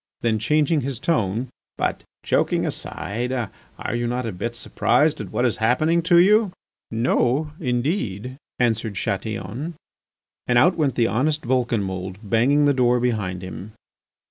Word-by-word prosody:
Then 110 -2 +1
changing 150 +6 +2
his 135 -2 -3
tone: 115 - 0 0.3
"But, - - -1 0.2
joking - - +1
aside, 115 +8 -3 0.5
are - - -3
you 120 0 -1
not 125 +1 -2
a 115 - -2
bit 115 +6 -4
surprised - - +1
at - - -7
what - - 0
is - - +1
happening 155 +9 +2
to 175 - +7
you?" 205 +2 +5 0.4
"No, 125 +5 +1
indeed," 125 - -2 0.2
answered 110 -3 0
Chatillon. 110 - -3 0.7
And 120 - +3
out 175 +9 +5
went 145 -5 0
the 120 - +3
honest 145 +8 0
Vulcanmould, 100 -7 -1
banging 125 +8 +3
the 145 - +4
door 125 -2 +3
behind 105 -7 -1
him. 95 +3 -8
120 Hz, 145 wpm, -23 LUFS, 110-145 Hz, 0.7 s, to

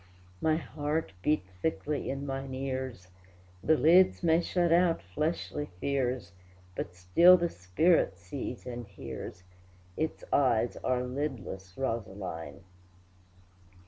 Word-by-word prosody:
My 155 -1 +3
heart 155 - -2
beat 150 +4 +2 0.2
thickly 150 0 -1
in 135 +1 -3
mine 135 -1 -4
ears; 130 -7 -4 0.5
The 160 - +4
lids 180 +4 +5
may 165 0 +4
shut 175 -1 +1
out 170 -1 +4
fleshly 150 - -2
fears, 125 -7 -1 0.4
But 90 - -4
still 95 - +7
the 170 -1 0
spirit 95 - +2
sees 110 +8 -6
and 120 -3 -6
hears, 90 0 -8 0.5
Its 160 0 -2
eyes 120 -4 +3
are 125 -1 0
lidless, 125 -9 -5
Rosaline! 95 - -4
130 Hz, 110 wpm, -30 LUFS, 95-155 Hz, 0.5 s, still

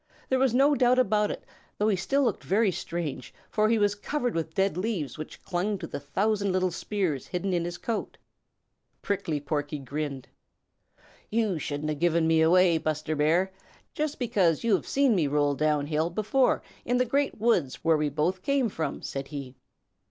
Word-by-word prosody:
There 260 - +2
was 265 -2 +3
no 275 +5 +4
doubt 250 -2 +3
about 210 -4 +3
it, - - -5 0.3
though 210 - +1
he 210 - +3
still 270 +10 +1
looked 235 -7 0
very 205 +1 +2
strange, 160 -6 -5 0.2
for 215 0 +2
he 230 - +3
was 205 -1 +3
covered 245 +4 -2
with 160 -1 -3
dead 195 -2 +2
leaves 185 -6 -2
which 155 -1 -9
clung 190 +3 -1
to 180 - -6
the - - -5
thousand 200 +7 0
little 185 0 +1
spears 175 -6 -2
hidden 185 +1 -2
in 170 -1 0
his 175 0 -4
coat. 230 -2 -4 0.9
Prickly 165 -7 -1
Porky 145 0 -3
grinned. 140 0 -5 1.0
"You 215 -6 0
shouldn't 145 +1 -3
have 150 -2 -3
given 170 -1 +2
me 160 0 +4
away, 170 0 +5
Buster 155 0 -2
Bear, 165 +6 +2 0.4
just 305 0 -2
because 200 - +1
you 230 -2 +2
have 190 - 0
seen 275 -3 +3
me 170 -7 +2
roll 145 0 +2
down 150 0 +1
hill 155 +2 0
before 215 +8 +1 0.2
in 245 +1 +1
the 250 - +3
Great 275 +4 0
Woods 185 - +1
where 165 0 +4
we 150 -1 0
both 160 +6 -1
came 275 +1 +1
from," 160 -5 -4
said 135 0 -4
he. 140 -3 -7
180 Hz, 185 wpm, -27 LUFS, 155-220 Hz, 1.0 s, away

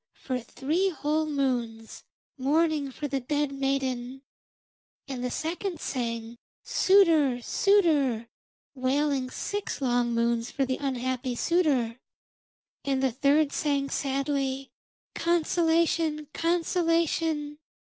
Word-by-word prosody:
for 255 -2 -3
three 310 +10 -1
whole 310 -2 -1
moons, 245 -6 -2 0.3
mourning 295 +1 +1
for 290 +3 -4
the 275 -1 -1
dead 290 +2 -1
maiden. 270 -1 -2 0.8
And 260 -3 -5
the 250 - -1
second 340 +5 -3
sang 230 -3 -4 0.2
'Suitor! 325 -10 +4
Suitor!' 300 - +2 0.5
wailing 270 0 0
six 410 +9 -4
long 245 -3 +1
moons 235 0 +1
for 275 - -1
the 260 0 -1
unhappy 255 -2 -2
suitor. 265 -8 +1 0.8
And 270 -1 0
the 265 - +2
third 285 +3 +3
sang 280 -2 0
sadly 275 -1 -1 0.4
'Consolation! 330 -2 +1
Consolation!' 330 -3 0
275 Hz, 100 wpm, -27 LUFS, 255-315 Hz, 0.8 s, Suitor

